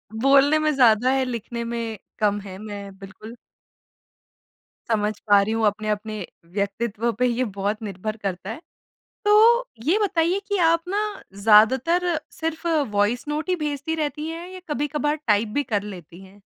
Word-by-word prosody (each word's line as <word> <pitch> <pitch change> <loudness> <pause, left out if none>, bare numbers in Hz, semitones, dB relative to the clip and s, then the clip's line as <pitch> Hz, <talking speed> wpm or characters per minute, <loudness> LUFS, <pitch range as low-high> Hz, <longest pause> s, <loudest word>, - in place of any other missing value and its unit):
बोलने 275 +5 +5
में 305 0 +2
ज़्यादा 245 -1 +4
है, 265 0 +2
लिखने 235 -1 -4
में 230 -2 -4 0.2
कम 205 -1 +2
है, 190 -1 -9
मैं 200 -2 -8
बिल्कुल 210 +4 -11 1.6
समझ 210 -1 +1
पा 205 -1 +6
रही 215 +3 -1
हूँ, 225 -1 +1
अपने-अपने 210 -1 -2 0.3
व्यक्तित्व 210 +3 -1
पे 250 - +3
ये 245 +1 +1
बहुत 205 +3 -1
निर्भर 215 +2 -5
करता 185 0 -4
है। 240 +9 -6 0.6
तो 455 +4 +6 0.2
ये 355 +8 +3
बताइए 355 -1 +1
कि 405 -1 0
आप 335 0 +3
ना 405 +2 0 0.4
ज़्यादातर 265 - +4
सिर्फ 325 +1 -4 0.2
वॉइस 205 +4 +1
नोट 305 +4 -3
ही 365 - +2
भेजती 300 0 -3
रहतीं 300 0 -3
हैं 335 +2 -6
या 370 0 -9
कभी-कभार 295 +1 -1
टाइप 210 0 +3
भी 290 - +2
कर 205 -1 +2
लेती 180 -3 -10
हैं? 200 +2 -18
235 Hz, 155 wpm, -23 LUFS, 210-305 Hz, 1.6 s, पा